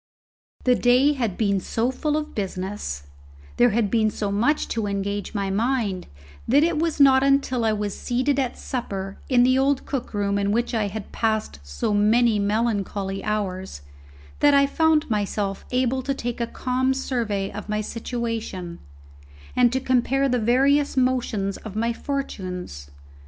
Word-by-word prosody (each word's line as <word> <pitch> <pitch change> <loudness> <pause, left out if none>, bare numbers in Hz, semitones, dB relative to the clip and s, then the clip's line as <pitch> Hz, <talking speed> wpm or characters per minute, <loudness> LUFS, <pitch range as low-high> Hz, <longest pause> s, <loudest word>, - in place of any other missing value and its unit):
The 250 - +4
day 250 +4 +4
had 235 -9 -2
been 200 -3 +1
so 230 +6 -1
full 300 +3 -1
of 305 0 -4
business, 190 - -4 0.5
there 245 - +5
had 215 -2 0
been 220 -2 +3
so 205 -1 -3
much 240 +10 +1
to 225 -3 -1
engage 200 +1 -3
my 200 -1 -1
mind, 215 -3 -1 0.4
that 280 +6 +5
it 330 -2 +1
was 325 -2 -1
not 265 -2 +6
until 275 -3 +2
I 220 -1 +2
was 205 -1 -3
seated 260 +3 0
at 260 -3 -1
supper 195 -6 -5
in 245 -2 +5
the 255 +1 +4
old 275 0 +1
cook 270 -4 -4
room 200 0 0
in 200 0 0
which 235 +3 0
I 220 -3 +1
had 200 +1 -7
passed 220 - -1
so 70 - -2
many 215 +2 +3
melancholy 200 -2 -1
hours, 190 - -3 0.6
that 290 -1 +5
I 280 0 +6
found 315 +1 +2
myself 205 -2 -2
able 255 +1 +1
to 275 +1 -2
take 240 -2 -4
a 235 - 0
calm 260 +2 0
survey 225 -7 -2
of 210 +1 -8
my 210 0 0
situation, 225 -6 -4 0.8
and 245 -1 +4
to 260 - 0
compare 265 +1 +1
the 250 -2 +1
various 275 +6 +2
motions 240 -6 0
of 215 -2 -9
my 230 +2 0
fortunes. 185 - -5
230 Hz, 160 wpm, -24 LUFS, 200-260 Hz, 0.8 s, not